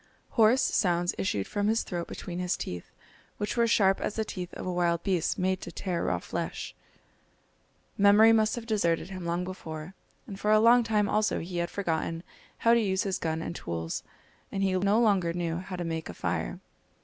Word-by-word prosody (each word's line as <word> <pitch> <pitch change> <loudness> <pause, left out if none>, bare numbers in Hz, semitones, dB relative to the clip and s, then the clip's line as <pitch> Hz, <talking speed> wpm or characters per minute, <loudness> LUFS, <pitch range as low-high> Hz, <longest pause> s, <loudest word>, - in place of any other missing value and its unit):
Hoarse 230 +3 +4
sounds 175 -2 +1
issued 100 - 0
from 205 0 -1
his 225 +1 +2
throat 175 -1 -4
between 175 -1 -6
his 180 0 0
teeth, 90 -1 -6 0.5
which 205 - -2
were 235 -1 +3
sharp 195 -4 +3
as - - -2
the 220 - -1
teeth 180 -3 -6
of - - -6
a 185 - -2
wild 170 -1 +1
beast 185 -4 0
made 185 0 0
to - - -7
tear 180 -3 -3
raw - - +1
flesh. - - -5 1.3
Memory 205 +3 +7
must 220 -1 +3
have 240 -2 -6
deserted 190 -5 0
him 185 -2 -6
long 170 +1 0
before, 170 -2 -7 0.3
and 195 -1 -8
for 210 - -1
a 215 - +6
long 235 +2 +6
time 210 -2 +1
also 215 +1 +1
he 175 +1 -5
had 170 0 -1
forgotten 165 -3 -2 0.3
how 230 - +4
to 235 - +4
use 190 -3 +1
his 195 -2 -2
gun 160 0 -2
and 170 - -5
tools, 80 -1 -4 0.5
and 195 0 -1
he 190 -1 +2
no 200 +4 +3
longer 195 -7 +3
knew 170 -1 -2
how 185 +1 -6
to 175 - -3
make 165 -1 -4
a 90 - -7
fire! - - -2
185 Hz, 200 wpm, -28 LUFS, 170-210 Hz, 1.3 s, Memory